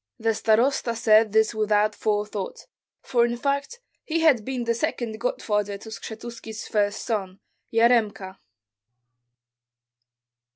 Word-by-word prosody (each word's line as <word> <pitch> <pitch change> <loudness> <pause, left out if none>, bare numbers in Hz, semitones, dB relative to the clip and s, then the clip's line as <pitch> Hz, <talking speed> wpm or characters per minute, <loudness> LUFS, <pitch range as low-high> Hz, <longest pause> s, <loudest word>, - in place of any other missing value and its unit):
The 225 0 +1
starosta 230 +3 +2
said 220 -1 +4
this 220 +1 +3
without 215 -1 +2
forethought, 210 -2 -3 0.4
for 240 -2 +2
in 240 0 0
fact 280 - -2 0.2
he 330 +1 -1
had 285 -9 +4
been 255 +1 -3
the 235 0 +1
second 230 -4 -3
godfather 210 -4 -1
to 220 - -11
Skshetuski's 225 0 -8
first 205 -1 0
son, 195 -4 -3 0.3
Yaremka. 225 -5 +2
225 Hz, 115 wpm, -25 LUFS, 210-240 Hz, 0.4 s, said